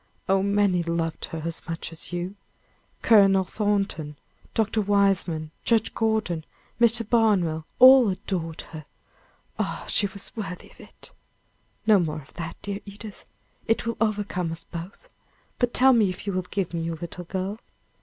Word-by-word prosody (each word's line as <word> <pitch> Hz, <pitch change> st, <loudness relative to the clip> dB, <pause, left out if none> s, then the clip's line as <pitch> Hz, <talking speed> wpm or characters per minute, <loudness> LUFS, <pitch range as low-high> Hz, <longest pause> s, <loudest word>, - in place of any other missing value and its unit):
Oh, 195 Hz, 0 st, +3 dB
many 200 Hz, -2 st, +2 dB
loved 170 Hz, -1 st, -2 dB
her 160 Hz, -1 st, -6 dB
as 165 Hz, +1 st, -4 dB
much 165 Hz, +1 st, -4 dB
as 165 Hz, +1 st, -8 dB
you! 175 Hz, +2 st, -3 dB, 0.7 s
Colonel 195 Hz, -3 st, +6 dB
Thornton, 195 Hz, -7 st, -1 dB, 0.4 s
Dr. 220 Hz, 0 st, +1 dB
Weismann, 195 Hz, -6 st, +1 dB
Judge 225 Hz, -1 st, +2 dB
Gordon, 220 Hz, -7 st, 0 dB, 0.4 s
Mr. 235 Hz, -1 st, +4 dB
Barnwell, 190 Hz, -9 st, +2 dB
all 255 Hz, -2 st, +8 dB
adored 175 Hz, -4 st, -3 dB
her! 155 Hz, -2 st, -8 dB, 0.7 s
Ah! -, -, -2 dB
she 205 Hz, -, +2 dB
was 200 Hz, 0 st, -8 dB
worthy 195 Hz, -5 st, -6 dB
of -, -, -22 dB
it." -, -, -15 dB, 0.7 s
"No 215 Hz, -3 st, +6 dB
more 155 Hz, -3 st, -2 dB
of 135 Hz, -, -22 dB
that, 165 Hz, -1 st, -6 dB
dear 200 Hz, 0 st, -3 dB
Edith, 205 Hz, +1 st, -10 dB, 0.4 s
it 225 Hz, +1 st, +1 dB
will 230 Hz, 0 st, -2 dB
overcome 205 Hz, -6 st, -1 dB
us 165 Hz, 0 st, -6 dB
both; 175 Hz, -, -9 dB, 0.5 s
but 245 Hz, -1 st, +2 dB
tell 265 Hz, +2 st, +5 dB
me 220 Hz, -5 st, +4 dB
if 185 Hz, -, -7 dB
you 200 Hz, -, -2 dB
will 185 Hz, -1 st, -2 dB
give 190 Hz, -4 st, -2 dB
me 170 Hz, -, -1 dB
your 165 Hz, 0 st, -3 dB
little 170 Hz, +2 st, -7 dB
girl?" 190 Hz, +4 st, -3 dB
195 Hz, 155 wpm, -25 LUFS, 170-215 Hz, 0.7 s, all